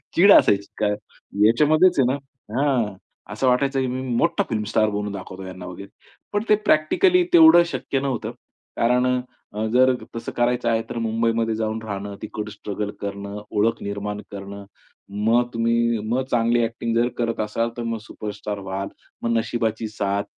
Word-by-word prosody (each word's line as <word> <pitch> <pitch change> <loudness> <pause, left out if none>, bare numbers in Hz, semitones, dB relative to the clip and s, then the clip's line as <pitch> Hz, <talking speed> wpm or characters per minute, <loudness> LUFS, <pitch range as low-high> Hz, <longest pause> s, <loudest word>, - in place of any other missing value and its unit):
चीड 200 +4 +7
असायची. 100 0 +5 0.8
याच्यामध्येच 155 +9 +4
आहे 130 - +5
ना - - -1 0.4
हां, 125 -8 +1 0.4
असं 120 +5 0
वाटायचं 135 +2 +2
की 130 - 0
मी 130 +1 -3 0.2
मोठा - - +2
फिल्म 110 -1 -1
स्टार 110 -1 +3
बनून 105 0 -3
दाखवतो 95 -1 -8
यांना 95 -1 -8
वगैरे 95 +2 -9 0.4
पण 205 +1 +1
ते 210 - +7
प्रॅक्टिकली 360 - +4
तेवढं 320 - +8
शक्य 130 +1 -2
नव्हतं 135 -4 -2 0.5
कारण, 125 +1 +2 0.5
जर 130 +2 +5 0.2
तसं 115 - -5
करायचं 120 0 +1
आहे 115 -1 +2
तर - - -5
मुंबईमध्ये 115 0 0
जाऊन 110 0 -2
राहणं 100 -1 -5
तिकडं 105 0 -5
स्ट्रगल 105 0 -5
करणं, 100 0 -5
ओळख 110 +2 +1
निर्माण 105 +1 -4
करणं 100 0 -8 0.6
मग 120 +2 +3
तुम्ही 115 0 +1
मग 125 +3 +1
चांगली 120 0 +2
ॲक्टिंग 115 0 -2
जर 120 +1 +3
करत 115 -1 -1
असाल 110 +2 -1
तर 120 - -3
मग 115 0 -2
सुपरस्टार 105 -1 -6
व्हाल 95 +1 -3 0.4
मग 115 - 0
नशिबाची 115 -1 -1
साथ 100 -1 -1
115 Hz, 155 wpm, -23 LUFS, 105-125 Hz, 0.8 s, तेवढं